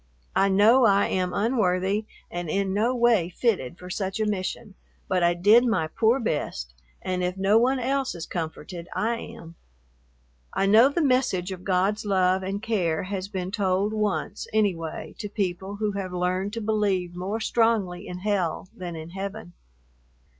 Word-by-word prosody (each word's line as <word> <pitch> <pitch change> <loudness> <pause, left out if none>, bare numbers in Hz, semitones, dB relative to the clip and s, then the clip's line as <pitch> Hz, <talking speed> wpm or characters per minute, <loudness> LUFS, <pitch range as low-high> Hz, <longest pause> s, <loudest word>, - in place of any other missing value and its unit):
I 195 - +4
know 220 +6 +5
I 200 -2 +4
am 185 -1 0
unworthy 205 -2 +1 0.2
and 175 -2 -4
in 195 +2 0
no 230 +5 +1
way 235 -8 +3
fitted 180 - -1
for 180 +1 -9
such 195 +1 -3
a 215 - +1
mission, 205 +1 -3 0.3
but 185 -1 +1
I 175 0 +3
did 210 +7 +6
my 225 -10 +1
poor 225 +10 +2
best, 145 - -3 0.3
and 180 -1 -1
if 180 +1 -2
no 195 +3 +4
one 260 +3 +2
else 265 0 -1
is 165 -1 -6
comforted, 170 +1 -6
I 230 +2 0
am. 170 -9 -10 1.0
I 195 - +2
know 220 +6 +6
the 315 +3 0
message 250 -9 +1
of 185 -1 -7
God's 195 +3 +1
love 190 -2 +2
and 195 +2 -4
care 175 -9 0
has 190 0 -4
been 190 -2 -4
told 200 0 0
once, 210 -1 -2
anyway, 185 -7 -1
to 210 - -4
people 190 -1 -3
who 210 0 -1
have 195 -2 -4
learned 185 +3 -1
to 230 - -3
believe 200 -5 0
more 190 +5 -3
strongly 215 -5 +1
in 180 0 -7
hell 185 -3 -1
than 175 -2 -6
in 160 +1 -8
heaven. 195 -1 -6
195 Hz, 170 wpm, -25 LUFS, 180-220 Hz, 1.0 s, did